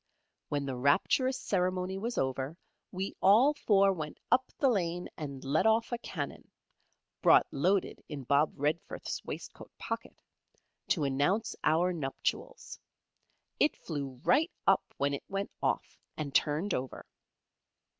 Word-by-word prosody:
When 145 -1 -1
the 135 -2 -3
rapturous 195 - +2
ceremony 185 0 -1
was 235 +4 -3
over, 135 +4 -1 0.3
we 190 +2 -3
all 230 +10 +6
four 200 -8 +3
went 155 -4 -6
up 255 +1 +3
the 275 - +3
lane 180 -7 0
and 140 -3 -6
let 140 +10 +2
off 225 +2 +2
a 240 - -2
cannon 145 -11 -6 0.7
(brought - - +6
loaded 185 +7 0
in 145 -3 -5
Bob 140 +4 +3
Redforth's 150 +4 -2
waistcoat - - -8
pocket) - - -6 0.6
to - - +1
announce 145 +11 +1
our 175 +3 +3
nuptials. 155 - -4 0.8
It 300 - +3
flew 140 -5 -5
right 320 +4 +4 0.2
up - - +5 0.2
when 140 +1 +1
it 140 - -4
went 195 +1 -3
off, - - -1 0.2
and 145 -3 -4
turned 155 +8 +1
over. 130 +1 -4
170 Hz, 135 wpm, -31 LUFS, 140-200 Hz, 0.8 s, all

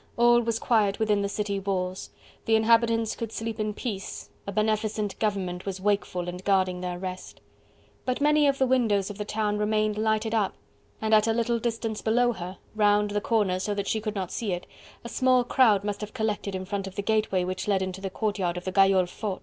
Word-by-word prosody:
All 240 0 +5
was 230 -1 -1
quiet 210 -4 +2
within 210 -2 +1
the 200 - -1
city 200 -1 -2
walls: 185 -1 -3 0.4
the 225 - +3
inhabitants 225 0 +3
could 230 -2 -5
sleep 225 0 -4
in 210 -1 -2
peace, 205 -6 -5 0.2
a - - -2
beneficent 215 0 -1
government 190 -4 -2
was 190 -1 -3
wakeful 190 -3 -1
and 180 +1 -6
guarding 185 -2 +1
their 180 -1 -3
rest. 185 0 -7 0.6
But 255 -1 -1
many 300 0 +4
of 275 -1 +2
the 265 - +3
windows 220 -6 +2
of 205 - -11
the 210 - -2
town 210 -1 -1
remained 215 0 +1
lighted 220 0 0
up, 210 -4 +1 0.5
and 220 0 +1
at 215 +1 +5
a 225 - +3
little 235 0 0
distance 225 -2 -2
below 240 +2 +3
her, 185 -2 -7 0.2
round 210 -1 +3
the 205 0 0
corner 205 -5 +1
so 205 +2 -2
that 200 -1 -3
she 220 - 0
could 215 0 -4
not 190 -3 -3
see 210 -5 -2
it, 175 - -4 0.4
a - - -6
small 255 +1 +3
crowd 225 -5 +4
must 205 0 -3
have 210 0 -7
collected 210 -2 -2
in 185 0 -4
front 195 0 -3
of 190 - -9
the 200 - -3
gateway 215 -3 +1
which 185 +2 -3
led 195 -2 +2
into 190 0 -5
the 195 - -3
courtyard 190 -4 -1
of 180 - -6
the 185 - -2
Gayole 195 -1 +4
Fort. 195 +1 -4
210 Hz, 215 wpm, -27 LUFS, 195-225 Hz, 0.6 s, All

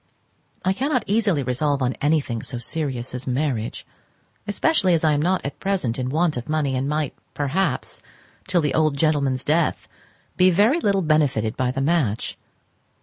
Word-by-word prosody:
I 190 - +3
cannot 260 +2 0
easily 200 -8 +1
resolve 135 +2 0
on 125 +1 +1
anything 145 -6 +1
so 125 - -4
serious 130 -1 -3
as 125 +1 -6
marriage; 125 -4 -2 0.6
especially 205 - +2
as 165 - -1
I 155 -1 +4
am 145 - +1
not 180 +1 0
at 140 - -5
present 180 -12 -1
in 125 0 -2
want 155 0 +1
of 120 +4 -6
money, 150 -4 0
and 130 +2 -1
might 150 -2 -1 0.2
perhaps, 145 +7 -1 0.5
till 185 -2 +2
the 150 - 0
old 155 -3 +2
gentleman's 140 -4 +1
death, 155 +2 0 0.5
be 185 +1 +6
very 210 - +3
little 200 - +1
benefited 140 -9 +1
by 130 -1 0
the 135 +2 -2
match. 135 -8 0
150 Hz, 165 wpm, -23 LUFS, 130-175 Hz, 0.6 s, be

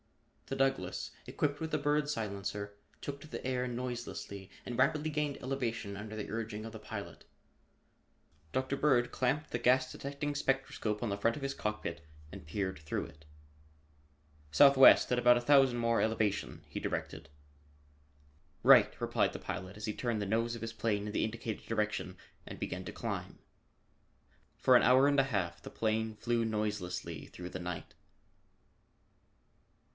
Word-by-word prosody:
The 135 - -3
Douglass 135 0 0 0.2
equipped 145 0 -1
with 160 0 -3
the 155 - +2
Bird 145 0 +1
silencer, 100 -4 -3 0.3
took 140 0 -5
the 155 -3 -7
air 125 -1 0
noiselessly 120 -5 -5 0.2
and 120 - -4
rapidly 150 +4 +2
gained 150 -2 -1
elevation 120 -6 -3
under 105 +2 -7
the 105 - -5
urging 110 -1 -4
of 115 - -8
the 110 - -7
pilot. 105 -1 -7 1.3
Dr. 130 +1 -1
Bird 135 -4 +3
clamped 145 +4 0
the 120 - -1
gas 130 +2 +4
detecting 140 +1 -4
spectroscope 135 -6 -1
on 120 - -1
the 100 - -1
front 115 +5 +1
of 145 - -7
his 135 0 -1
cockpit 105 -8 -4 0.3
and - - -9
peered 95 +1 -2
through 75 0 -3
it. 75 +1 -15 1.3
"Southwest, 135 - +8
at 125 - +3
about 120 0 +6
a - - -1
thousand 135 -1 +5
more 115 -1 +2
elevation," 110 -2 0
he - - -5
directed. - - -4 1.3
"Right!" - - +7
replied - - +1
the - - -7
pilot 95 +2 -6
as 105 - -5
he 105 - -2
turned 115 -3 -1
the - - -1
nose 115 +3 0
of 115 - -8
his 115 0 -4
plane 105 -3 -1
in 105 - -5
the - - +1
indicated 110 -1 -4
direction 105 -4 -1 0.3
and - - -8
began - - -4
to - - -5
climb. - - -5 1.2
For 130 - +5
an - - +7
hour 130 +2 +6
and 145 -1 +3
a - - +6
half 85 -5 -1
the - - -8
plane 110 0 -1
flew 120 +1 0
noiselessly 100 -7 -3
through 90 0 -8
the 95 - -5
night. 90 -1 -5
115 Hz, 160 wpm, -33 LUFS, 105-135 Hz, 1.3 s, Southwest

